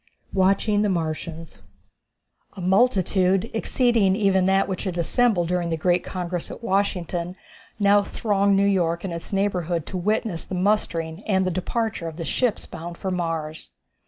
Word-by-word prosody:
Watching 200 Hz, +2 st, +2 dB
the 210 Hz, -, +2 dB
Martians. 165 Hz, -1 st, -4 dB, 0.9 s
A 200 Hz, -, -11 dB
multitude, 190 Hz, 0 st, +2 dB
exceeding 225 Hz, -4 st, +2 dB
even 195 Hz, -3 st, +2 dB
that 195 Hz, 0 st, +3 dB
which 190 Hz, 0 st, -4 dB
had 180 Hz, -2 st, -3 dB
assembled 180 Hz, +1 st, +2 dB
during 180 Hz, -1 st, 0 dB
the 165 Hz, -, -1 dB
great 175 Hz, +2 st, +2 dB
congress 180 Hz, -2 st, -4 dB
at -, -, -9 dB
Washington, 180 Hz, -4 st, -1 dB, 0.4 s
now 205 Hz, 0 st, +5 dB
thronged 200 Hz, -1 st, +1 dB
New 200 Hz, -, +3 dB
York 170 Hz, -4 st, +1 dB
and 190 Hz, -3 st, -4 dB
its 170 Hz, -, -7 dB
neighborhood 180 Hz, -5 st, 0 dB
to 185 Hz, -, -5 dB
witness 205 Hz, -1 st, -1 dB
the 190 Hz, -, -6 dB
mustering 180 Hz, -3 st, 0 dB
and 190 Hz, -3 st, +2 dB
the 185 Hz, -, 0 dB
departure 185 Hz, +1 st, -2 dB
of 160 Hz, -1 st, -7 dB
the 165 Hz, -, -4 dB
ships 245 Hz, +4 st, 0 dB
bound 170 Hz, +1 st, -8 dB
for 190 Hz, -, -3 dB
Mars. 165 Hz, -3 st, -3 dB
185 Hz, 160 wpm, -24 LUFS, 170-200 Hz, 0.9 s, now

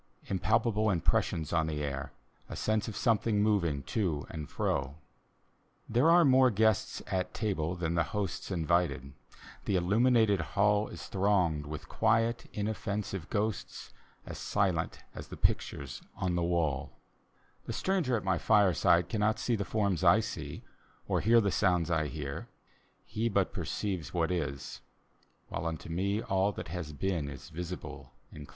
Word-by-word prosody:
Impalpable 110 Hz, +3 st, +1 dB
impressions 80 Hz, -3 st, 0 dB
on 80 Hz, -2 st, +2 dB
the 75 Hz, -1 st, -2 dB
air, 70 Hz, -2 st, -4 dB, 0.4 s
A -, -, -5 dB
sense 110 Hz, 0 st, 0 dB
of 110 Hz, -, -5 dB
something 110 Hz, -2 st, +2 dB
moving 85 Hz, -10 st, +1 dB
to 80 Hz, -, -1 dB
and 75 Hz, -3 st, -6 dB
fro. 70 Hz, +1 st, -1 dB, 0.9 s
There 125 Hz, +8 st, +3 dB
are 170 Hz, 0 st, +7 dB
more 130 Hz, -1 st, +6 dB
guests 110 Hz, -1 st, +1 dB
at 95 Hz, -1 st, -2 dB
table 90 Hz, -6 st, -1 dB
than 85 Hz, -2 st, -2 dB
the 85 Hz, -, +2 dB
hosts 100 Hz, -5 st, -3 dB
Invited; 85 Hz, -5 st, 0 dB, 0.5 s
the 100 Hz, -, +1 dB
illuminated 105 Hz, +2 st, +3 dB
hall 105 Hz, +4 st, +2 dB
Is -, -, -8 dB
thronged 90 Hz, -7 st, +1 dB
with 75 Hz, -1 st, -7 dB
quiet, 115 Hz, +1 st, +1 dB
inoffensive 100 Hz, -4 st, -3 dB
ghosts, 110 Hz, 0 st, -3 dB, 0.3 s
As -, -, -7 dB
silent 95 Hz, -5 st, -1 dB
as -, -, -8 dB
the -, -, -9 dB
pictures 70 Hz, -4 st, -1 dB
on 90 Hz, -1 st, -1 dB
the 85 Hz, -, 0 dB
walL 80 Hz, -5 st, 0 dB, 0.8 s
The -, -, -3 dB
stranger 175 Hz, -11 st, +1 dB
at 105 Hz, -, -5 dB
my 95 Hz, -3 st, +1 dB
fireside 90 Hz, -4 st, +4 dB
cannot 105 Hz, +2 st, +1 dB
see 120 Hz, +2 st, 0 dB
The 100 Hz, -, -1 dB
forms 100 Hz, -6 st, 0 dB
I -, -, +6 dB
see, -, -, -5 dB, 0.4 s
or -, -, +1 dB
hear 115 Hz, +3 st, +5 dB
the 100 Hz, -3 st, +1 dB
sounds 90 Hz, -3 st, +2 dB
I 80 Hz, -2 st, +1 dB
hear; 70 Hz, -2 st, -5 dB, 0.6 s
He 115 Hz, +2 st, -1 dB
but 100 Hz, -3 st, +1 dB
perceives 90 Hz, -7 st, -3 dB
what 85 Hz, 0 st, +1 dB
is; 75 Hz, -6 st, -3 dB, 0.7 s
while 85 Hz, -, -3 dB
unto 80 Hz, 0 st, -5 dB
me 100 Hz, +6 st, -1 dB
All 95 Hz, +1 st, +1 dB
that -, -, -7 dB
has 85 Hz, -2 st, -5 dB
been 80 Hz, -1 st, -2 dB
is 70 Hz, -, -9 dB
visible 85 Hz, +1 st, -7 dB, 0.2 s
and 75 Hz, -1 st, -10 dB
dear. -, -, -28 dB
95 Hz, 155 wpm, -31 LUFS, 80-105 Hz, 0.9 s, are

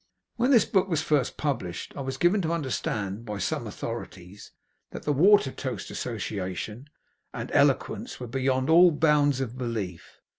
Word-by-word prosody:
When 250 Hz, -, +1 dB
this 240 Hz, -7 st, +6 dB
book 190 Hz, -1 st, +1 dB
was 165 Hz, -4 st, 0 dB
first 145 Hz, -5 st, 0 dB
published, 115 Hz, -, -3 dB
I -, -, -5 dB
was 135 Hz, 0 st, -4 dB
given 175 Hz, +7 st, +3 dB
to 165 Hz, -2 st, -1 dB
understand, 115 Hz, -, -2 dB
by 105 Hz, -3 st, -5 dB
some 100 Hz, -, -2 dB
authorities, 90 Hz, +3 st, -7 dB, 0.4 s
that -, -, -8 dB
the 150 Hz, -, +1 dB
Watertoast 145 Hz, -5 st, +2 dB
Association 105 Hz, +2 st, -5 dB, 0.5 s
and -, -, -5 dB
eloquence -, -, +1 dB
were 125 Hz, -, -5 dB
beyond 130 Hz, +1 st, 0 dB
all 175 Hz, +2 st, +7 dB
bounds 150 Hz, -3 st, +2 dB
of 125 Hz, 0 st, -5 dB
belief. 105 Hz, -9 st, -5 dB
130 Hz, 150 wpm, -27 LUFS, 110-155 Hz, 0.5 s, all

